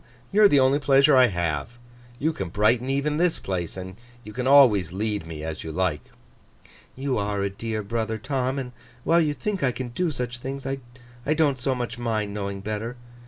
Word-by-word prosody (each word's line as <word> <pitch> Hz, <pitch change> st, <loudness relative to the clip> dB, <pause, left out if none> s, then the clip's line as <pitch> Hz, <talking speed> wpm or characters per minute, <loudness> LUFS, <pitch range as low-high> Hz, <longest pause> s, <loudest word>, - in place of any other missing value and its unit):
You 210 Hz, -, +3 dB
are 210 Hz, -, +9 dB
the 145 Hz, -8 st, +4 dB
only 135 Hz, +2 st, +4 dB
pleasure 140 Hz, +1 st, +5 dB
I 130 Hz, -1 st, +7 dB
have—you 120 Hz, -, -4 dB
can 120 Hz, -, -4 dB
brighten 110 Hz, +7 st, +2 dB
even 140 Hz, +2 st, 0 dB
this 175 Hz, 0 st, +2 dB
place—and 95 Hz, +1 st, -5 dB, 0.3 s
you 105 Hz, -, -10 dB
can 125 Hz, +2 st, -2 dB
always 120 Hz, -, +6 dB
lead 105 Hz, -2 st, -2 dB
me 80 Hz, -2 st, -7 dB
as 80 Hz, -1 st, -5 dB
you 80 Hz, -, -5 dB
like.' 90 Hz, -2 st, -1 dB, 0.9 s
'You 130 Hz, -3 st, -1 dB
are 100 Hz, -1 st, -1 dB
a 100 Hz, -, -1 dB
dear 110 Hz, +1 st, -4 dB
brother, 110 Hz, +1 st, -2 dB
Tom; 130 Hz, +3 st, -2 dB
and 130 Hz, -2 st, -4 dB, 0.3 s
while 170 Hz, +1 st, +4 dB
you 150 Hz, -2 st, 0 dB
think 200 Hz, +3 st, -3 dB
I 130 Hz, -, +2 dB
can 125 Hz, 0 st, -5 dB
do 170 Hz, +9 st, -1 dB
such 125 Hz, -4 st, -4 dB
things, 135 Hz, +2 st, -6 dB
I 120 Hz, 0 st, -5 dB
don't 145 Hz, -4 st, +2 dB
so 130 Hz, +1 st, 0 dB
much 120 Hz, -1 st, -4 dB
mind 110 Hz, -4 st, -1 dB
knowing 100 Hz, -1 st, -4 dB
better. 110 Hz, +4 st, -4 dB
120 Hz, 190 wpm, -25 LUFS, 105-135 Hz, 0.9 s, are